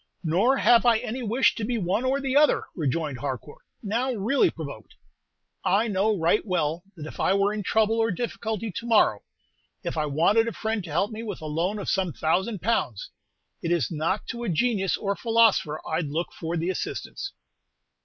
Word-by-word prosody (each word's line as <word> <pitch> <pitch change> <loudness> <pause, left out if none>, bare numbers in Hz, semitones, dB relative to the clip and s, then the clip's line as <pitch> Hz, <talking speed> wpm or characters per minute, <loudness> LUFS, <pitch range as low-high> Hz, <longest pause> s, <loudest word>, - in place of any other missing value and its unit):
"Nor 195 +12 +3
have 235 0 +5
I 240 -2 +5
any 245 +2 -4
wish 240 +3 +3
to 225 - -5
be 240 +2 -1
one 200 +3 0
or 265 +2 +1
the 270 -1 -2
other," 300 +1 +5
rejoined 150 -3 -2
Harcourt, 140 +1 -5 0.2
now 235 +5 0
really 235 +4 +2
provoked. 140 -9 -9 0.7
"I 210 +5 +2
know 205 +1 +1
right 170 +5 +2
well 170 -4 -1 0.2
that 150 - -7
if - - -9
I 190 - +3
were 200 +1 +2
in 215 - -3
trouble 220 +2 +2
or 225 0 +2
difficulty 220 0 -3
to 230 +7 -6
morrow, 210 - +4 0.6
if - - -4
I 155 -1 0
wanted 175 +10 +3
a 230 - -2
friend 220 -2 -2
to - - -9
help 175 +8 0
me 220 +1 -6
with 210 -5 -5
a 155 - -8
loan 170 +7 -1
of 205 - -6
some 185 -4 0
thousand 190 +5 0
pounds, 190 - -1 0.5
it 170 - -2
is 170 -9 +1
not 165 +6 -1
to 240 -1 -4
a 230 - -2
genius 195 +2 +1
or 200 - -2
a - - 0
philosopher 225 -10 +3
I 160 - 0
'd 150 - -4
look 165 +4 -3
for 165 +1 -4
the 170 +3 0
assistance." 395 - -5
200 Hz, 200 wpm, -26 LUFS, 165-230 Hz, 0.7 s, have